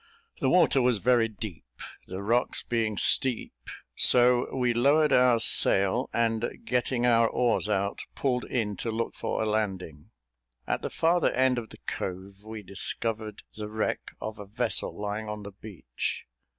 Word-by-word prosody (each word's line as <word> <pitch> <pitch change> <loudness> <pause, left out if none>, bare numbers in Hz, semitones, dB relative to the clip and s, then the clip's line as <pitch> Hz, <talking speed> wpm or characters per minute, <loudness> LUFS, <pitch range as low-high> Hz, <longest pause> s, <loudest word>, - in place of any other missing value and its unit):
The 130 - +1
water 170 -6 +4
was 125 -2 +2
very 120 +2 +2
deep, 100 - -9 0.4
the 95 +2 -6
rocks 120 +4 0
being 110 -3 -2
steep; 130 -3 +1 0.4
so, 125 0 +5
we 125 -2 0
lowered 145 +6 +3
our 125 -2 +4
sail, 110 +2 +4
and 115 0 -2
getting 125 0 -1
our 115 -1 +4
oars 120 -4 0
out, 100 -1 -1 0.2
pulled 125 -3 -1
in 105 -5 -2
to 115 - -4
look 115 +1 -3
for - - -3
a - - -1
landing. 95 -8 -3 0.6
At - - -2
the - - -4
farther 170 +1 +1
end 130 -1 +2
of 110 -2 -10
the - - -14
cove, 95 +1 -6
we 110 -1 -8
discovered 105 +2 -1
the 105 -1 -6
wreck 110 0 -3
of 110 0 -7
a 105 - -8
vessel 115 +1 0
lying 105 +1 -4
on 105 -1 -6
the 100 - -8
beach. 95 - -6
110 Hz, 160 wpm, -27 LUFS, 105-125 Hz, 0.6 s, so